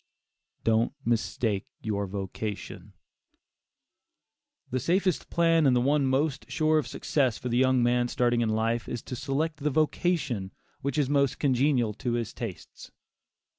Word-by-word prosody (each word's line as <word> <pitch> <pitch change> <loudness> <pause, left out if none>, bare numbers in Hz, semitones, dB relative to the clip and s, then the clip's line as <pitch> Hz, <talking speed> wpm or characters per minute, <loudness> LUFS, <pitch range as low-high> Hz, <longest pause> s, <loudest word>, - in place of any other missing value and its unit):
DON'T 115 +2 +2
MISTAKE 110 -3 0 0.2
YOUR 100 -2 -1
VOCATION. 100 +2 -6 1.8
The 130 - 0
safest 180 +6 0
plan, 165 -2 +3
and 130 - +4
the - - +4
one 140 +2 +2
most 135 +1 0
sure 155 +2 +2
of - - -3
success 130 -6 0
for 125 - -5
the 120 - +1
young 130 -1 +3
man 120 0 +2
starting 120 -1 +1
in 115 - +1
life, 115 +2 0
is 120 - -4
to 125 - -6
select 145 +5 -2
the 150 0 -1
vocation 145 - 0 0.3
which 140 0 -2
is 145 -3 +2
most 140 -2 +2
congenial 130 -4 +2
to 120 +3 -3
his 120 -2 -2
tastes. 115 -7 -8
125 Hz, 145 wpm, -28 LUFS, 115-145 Hz, 1.8 s, and